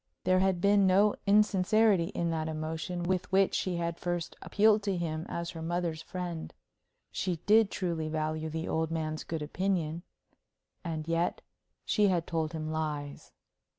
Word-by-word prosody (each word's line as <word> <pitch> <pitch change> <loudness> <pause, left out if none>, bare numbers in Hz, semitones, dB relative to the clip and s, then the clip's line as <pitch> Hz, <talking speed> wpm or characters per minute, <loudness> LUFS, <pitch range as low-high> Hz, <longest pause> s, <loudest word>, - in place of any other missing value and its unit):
There 185 0 +3
had 190 -1 +2
been 200 0 +4
no 200 +3 +4
insincerity 205 -1 +4
in 170 -2 -2
that 160 -1 -2
emotion 160 +3 -3
with 185 +1 -1
which 195 0 +3
she 185 -2 -1
had 170 0 -2
first 175 -1 -3
appealed 215 0 +3
to 200 -2 -1
him 160 -1 -3
as 170 +1 -3
her 165 -2 -8
mother's 170 -1 -2
friend; 175 -3 -5 0.6
she 180 -2 -1
did 215 0 +5
truly 170 -6 -2
value 155 0 -2
the 160 +1 -4
old 160 0 0
man's 155 -1 -3
good 160 -2 -4
opinion. 170 0 -1 0.8
And 160 -3 -4
yet 165 +1 0 0.4
she 210 -2 +3
had 175 -3 +1
told 160 -1 -2
him 155 -1 -4
lies. 150 -2 -4
170 Hz, 155 wpm, -30 LUFS, 160-190 Hz, 0.8 s, did